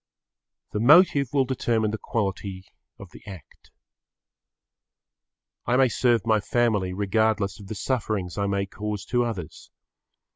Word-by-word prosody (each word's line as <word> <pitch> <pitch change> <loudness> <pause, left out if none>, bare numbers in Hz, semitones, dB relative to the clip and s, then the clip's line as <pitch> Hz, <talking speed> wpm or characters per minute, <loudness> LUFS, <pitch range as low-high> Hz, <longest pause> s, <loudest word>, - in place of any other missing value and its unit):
The 105 - -2
motive 140 - +5
will 135 -2 +2
determine 115 -4 0
the 110 - -4
quality 95 -3 -3 0.3
of - - -12
the - - -14
act. 95 -8 -13 2.0
I 125 - +2
may 130 -1 +4
serve 120 -1 +1
my 110 -1 +3
family 105 -4 0
regardless 100 +1 0
of 100 - -11
the 110 - -6
sufferings 105 -5 -2
I 100 -1 -1
may 100 0 -1
cause 105 0 -5
to 120 0 +1
others. 100 -9 -6
110 Hz, 135 wpm, -25 LUFS, 100-120 Hz, 2.0 s, motive